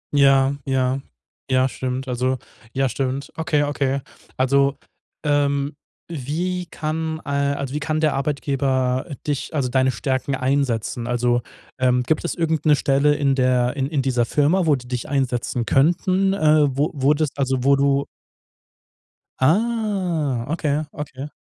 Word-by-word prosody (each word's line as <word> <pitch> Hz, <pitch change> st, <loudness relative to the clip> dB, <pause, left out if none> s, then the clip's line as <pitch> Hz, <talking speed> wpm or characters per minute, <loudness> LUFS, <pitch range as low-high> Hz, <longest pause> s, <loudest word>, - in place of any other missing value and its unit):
Ja, 135 Hz, -1 st, +5 dB
ja, 130 Hz, 0 st, 0 dB, 0.5 s
ja 130 Hz, 0 st, +3 dB
stimmt. 130 Hz, +1 st, -4 dB
Also, 130 Hz, +1 st, 0 dB, 0.3 s
ja 135 Hz, +1 st, +1 dB
stimmt. 135 Hz, +2 st, -3 dB
Okay, 150 Hz, -2 st, +1 dB
okay. 140 Hz, -1 st, -1 dB, 0.4 s
Also, 140 Hz, +1 st, +2 dB, 0.5 s
ähm, 145 Hz, -1 st, +1 dB, 0.3 s
wie 170 Hz, +5 st, -3 dB
kann, 160 Hz, 0 st, -3 dB
äh -, -, -6 dB, 0.3 s
also 140 Hz, -2 st, -4 dB
wie 150 Hz, -, -1 dB
kann 155 Hz, +1 st, -1 dB
der 155 Hz, -2 st, +2 dB
Arbeitgeber 135 Hz, -2 st, 0 dB, 0.2 s
dich 145 Hz, 0 st, -3 dB
also 135 Hz, -4 st, 0 dB
deine 130 Hz, +1 st, +2 dB
Stärken 130 Hz, +2 st, -1 dB
einsetzen? 130 Hz, -3 st, -1 dB
Also, 120 Hz, 0 st, +1 dB, 0.4 s
ähm, 125 Hz, -1 st, +3 dB
gibt 155 Hz, +4 st, 0 dB
es -, -, -2 dB
irgend 160 Hz, -2 st, -1 dB
'ne 150 Hz, -, +6 dB
Stelle 145 Hz, +1 st, +2 dB
in 140 Hz, -2 st, +2 dB
der 125 Hz, -1 st, +2 dB
in 135 Hz, -2 st, -1 dB
in 145 Hz, -2 st, -1 dB
dieser 125 Hz, -3 st, +1 dB
Firma, 160 Hz, +8 st, +2 dB
wo 150 Hz, -, +5 dB
die 125 Hz, -2 st, -9 dB
dich 125 Hz, -1 st, -4 dB
einsetzen 125 Hz, -3 st, -1 dB
könnten? 185 Hz, +8 st, +2 dB
Äh, 155 Hz, -4 st, +4 dB
wo 145 Hz, +2 st, +1 dB
wurdest 145 Hz, +1 st, +1 dB
also 130 Hz, -2 st, 0 dB
wo 140 Hz, +1 st, +5 dB
du 140 Hz, 0 st, +2 dB, 1.3 s
Ah, 180 Hz, -, +1 dB
okay, 150 Hz, -2 st, 0 dB
okay. 140 Hz, -2 st, -6 dB
140 Hz, 145 wpm, -22 LUFS, 130-150 Hz, 1.3 s, ne